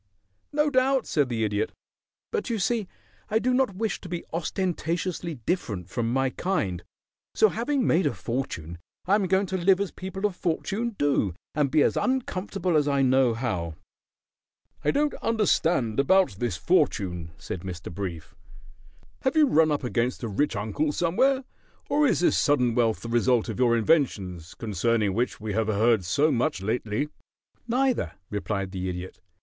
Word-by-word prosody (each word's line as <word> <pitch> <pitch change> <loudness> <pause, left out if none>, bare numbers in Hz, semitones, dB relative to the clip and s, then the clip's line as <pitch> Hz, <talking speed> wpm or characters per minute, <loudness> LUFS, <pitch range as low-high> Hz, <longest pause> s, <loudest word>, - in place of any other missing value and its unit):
"No 300 0 +2
doubt," 260 -1 +3
said 145 -4 +1
the 115 -2 -1
Idiot. 105 0 -1 0.6
"But 445 - -2
you 230 - 0
see 215 0 0 0.4
I 215 - +2
do 250 +3 +1
not 255 -6 +2
wish 220 +2 -2
to 180 - -9
be 175 -1 -4
ostentatiously 170 0 -2
different 105 - -2
from 115 -2 -1
my 135 +1 +1
kind, 95 - -2 0.5
so 220 - +5
having 250 +5 0
made 170 -1 +3
a 140 - -1
fortune 85 - -4 0.3
I 190 - +2
am 205 -2 +3
going 190 +2 +2
to 190 0 -2
live 185 +1 +4
as 200 -2 -2
people 190 +2 -5
of 205 -3 0
fortune 205 +7 -2
do 135 -11 +1 0.2
and 150 -3 +1
be 150 +1 +4
as - - +2
uncomfortable 195 -8 -1
as 150 -1 +3
I 140 -1 +2
know 130 -2 +3
how." 90 -10 -2 1.1
"I - - +2
don't 295 +1 +2
understand 175 - +1
about 190 +7 +4
this 120 -8 -1
fortune," 85 0 +1
said 90 - -6
Mr. 90 -2 -7
Brief. 85 -3 -5 0.9
"Have 265 +2 0
you 310 -1 +6
run 160 - +4
up 145 - -1
against 125 +1 -1
a - - -1
rich 130 +8 0
uncle 110 +9 -1
somewhere, 255 - +2 0.5
or 295 0 +3
is 245 - +1
this - - +3
sudden 125 -5 +3
wealth 115 -2 +1
the - - -6
result 120 0 +2
of - - -4
your 120 -2 +4
inventions, 100 - 0
concerning 105 -1 0
which 120 +4 -1
we 105 -1 -4
have 110 +1 0
heard 110 0 +3
so 145 - +2
much 135 +2 0
lately?" 110 +6 -2 0.6
"Neither," 245 - +1 0.2
replied 100 -1 -2
the 95 -1 -3
Idiot. 90 +1 -6
140 Hz, 165 wpm, -26 LUFS, -, 1.1 s, you